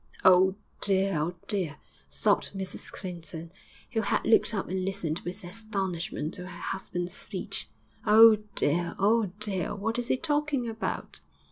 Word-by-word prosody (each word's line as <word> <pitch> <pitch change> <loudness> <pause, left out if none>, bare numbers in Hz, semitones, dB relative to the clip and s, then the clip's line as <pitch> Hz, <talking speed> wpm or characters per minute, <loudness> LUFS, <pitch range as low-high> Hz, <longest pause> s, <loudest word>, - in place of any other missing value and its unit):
'Oh, 185 +1 +7 0.2
dear! 195 -1 +3
oh, 165 +4 -1
dear!' 185 -8 +1 0.3
sobbed - - +1
Mrs 190 -1 -5
Clinton, 170 -3 -6 0.4
who 225 -2 +1
had 200 - 0
looked 225 - +4
up 200 -4 -2
and 185 0 -2
listened 185 -4 -2
with 185 +3 -6
astonishment 190 -4 -3
to 180 0 -6
her - - -9
husband's 175 -2 -4
speech. - - -4 0.3
'Oh, 220 +1 +8 0.2
dear! 170 +4 +1
oh, 215 +2 +3
dear! 200 -5 -1
what 225 +4 -2
is 240 - -3
he - - +2
talking 295 -4 0
about?' 225 -1 -4
195 Hz, 145 wpm, -28 LUFS, 180-220 Hz, 0.4 s, Oh